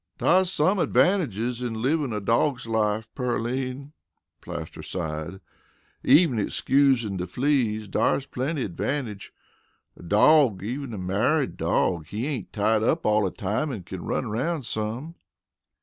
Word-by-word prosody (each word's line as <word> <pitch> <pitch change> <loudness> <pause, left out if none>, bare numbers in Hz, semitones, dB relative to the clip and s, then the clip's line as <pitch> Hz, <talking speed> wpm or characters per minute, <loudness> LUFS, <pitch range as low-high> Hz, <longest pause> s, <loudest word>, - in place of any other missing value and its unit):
"Dar's 185 0 +3
some 185 +4 +2
advantages 125 - +1
in 120 -2 -3
livin' 140 +2 0
a 105 - -2
dawg's 120 +5 +1
life, 110 -1 0
Pearline," 130 +3 -3 0.5
Plaster 85 -2 -7
sighed. 80 +1 -5 0.6
"Even 140 -3 +5
excusin' 125 -2 +2
de 90 0 -3
fleas, 125 -6 0
dar's 130 +7 +1
plenty 140 +2 -2
advantage. 105 - -4 0.6
A - - -15
dawg, 105 - +4
even 130 +4 -4
a - - -6
married 105 +11 0
dawg, 85 -4 0
he 105 +7 -3
ain't 135 -9 -4
tied 110 +1 +1
up 160 +9 +1
all 105 -2 +3
de - - -17
time 110 +10 -1
an' 105 -8 -6
kin 90 0 -7
run - - -2
aroun' 130 +8 -2
some." 115 +9 -4
115 Hz, 135 wpm, -25 LUFS, 105-140 Hz, 0.6 s, Even